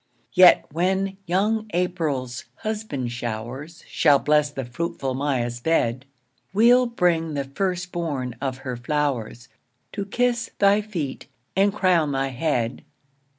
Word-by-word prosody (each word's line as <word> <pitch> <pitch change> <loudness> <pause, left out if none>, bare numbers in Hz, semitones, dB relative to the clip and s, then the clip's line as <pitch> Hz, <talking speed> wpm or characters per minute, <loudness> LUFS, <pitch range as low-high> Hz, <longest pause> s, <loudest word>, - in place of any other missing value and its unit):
Yet 180 -1 +7
when 190 +4 0
young 215 +5 +1
April's 155 -9 -2
husband 210 - -4
showers 120 +7 -6
Shall 145 -3 +4
bless 150 +1 +2
the 135 -3 -5
fruitful 135 +1 -3
Maia's 130 -3 -1
bed, 130 -4 0 0.5
We'll 245 +4 +6
bring 170 -8 +1
the 140 - -1
first 180 +5 -3
born 140 -8 -3
of 130 -2 -2
her 130 -1 -3
flowers, 125 -3 -2 0.4
To 200 -1 -4
kiss 240 +2 0
thy 200 +1 +4
feet, 170 -11 -5 0.3
and 200 +2 +4
crown 175 -7 +2
thy 135 0 0
head. 125 -3 -1
155 Hz, 125 wpm, -24 LUFS, 130-190 Hz, 0.5 s, Yet